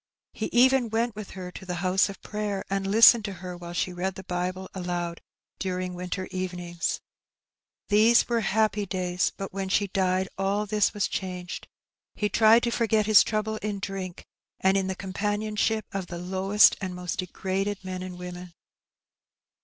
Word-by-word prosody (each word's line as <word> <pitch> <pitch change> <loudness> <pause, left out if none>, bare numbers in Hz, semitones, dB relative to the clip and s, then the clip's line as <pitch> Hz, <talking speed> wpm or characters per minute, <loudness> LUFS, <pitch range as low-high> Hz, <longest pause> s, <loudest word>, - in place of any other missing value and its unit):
He 215 - -3
even 250 0 +4
went 230 0 0
with 215 -1 -7
her 180 -1 -6
to - - -10
the 180 -1 -4
house 190 +2 +3
of 200 - -10
prayer, 210 -2 -3
and 195 0 0
listened 225 +2 +8
to 200 - -4
her 180 -1 -7
while 175 0 -8
she 180 +1 -1
read 185 +2 -2
the 190 - -8
Bible 185 +1 -3
aloud 175 -2 -3 0.4
during 185 -1 -2
winter 180 +1 -4
evenings. 180 -2 -3 0.9
These 220 +3 +5
were 235 -1 +1
happy 215 -1 +1
days, 180 -1 0
but 195 -1 -6
when 195 -1 -3
she 200 +1 +1
died 185 0 +1
all 200 +2 0
this 210 0 +2
was 205 - +1
changed; 180 -2 -5 0.5
he 210 - 0
tried 225 +2 +5
to 240 - +1
forget 220 -3 +2
his 215 -1 +7
trouble 215 0 -1
in 210 -1 -3
drink, 195 -2 -5 0.3
and 190 +1 +3
in 195 -1 +1
the 190 - -2
companionship 210 +3 -1
of 195 -2 -4
the 175 - -6
lowest 190 +4 +4
and 185 -2 -4
most 180 -1 -4
degraded 195 +2 -2
men 185 -1 -4
and 185 -1 -7
women. 180 -1 -8
190 Hz, 170 wpm, -27 LUFS, 180-210 Hz, 0.9 s, listened